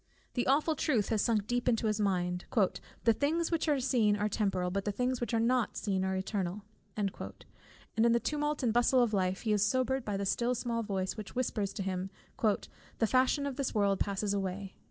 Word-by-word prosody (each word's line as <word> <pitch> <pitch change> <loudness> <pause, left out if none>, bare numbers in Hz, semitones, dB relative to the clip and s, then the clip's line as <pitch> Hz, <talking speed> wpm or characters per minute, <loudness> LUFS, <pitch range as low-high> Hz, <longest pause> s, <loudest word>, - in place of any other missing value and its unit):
The 245 - -1
awful 300 +4 +3
truth 255 -8 +1
has 220 -2 +2
sunk 215 -4 +1
deep 245 +2 0
into 225 -1 +1
his 215 -1 +1
mind, 180 -3 0 0.6
"the 230 - +5
things 320 +8 0
which 330 -1 0
are 290 -3 +3
seen 235 -5 +3
are 210 +1 +1
temporal, 190 -4 0
but 195 +1 -1
the 205 - -1
things 250 +4 -1
which 240 - -2
are 230 - +2
not 235 -1 +1
seen 195 -3 -1
are 190 0 0
eternal;" 190 0 -2 0.3
and 200 -2 0 0.8
in 230 +1 +5
the 235 - +4
tumult 295 +1 -1
and 230 -3 +2
bustle 245 +1 +4
of 225 -2 0
life, 185 -1 0
he 220 -2 +1
is 205 -1 +3
sobered 255 +3 +1
by 205 -3 -2
the 200 - -2
still 240 +5 +1
small 235 -1 -2
voice 195 -3 -2
which 215 +2 -8
whispers 215 -5 -1
to 195 - -3
him 185 0 -2 0.9
"the 225 - +2
fashion 260 +4 +2
of 275 -2 -4
this 275 -4 -2
world 200 -2 +2
passes 200 0 -1
away." 195 0 -3
220 Hz, 210 wpm, -31 LUFS, 195-250 Hz, 0.9 s, the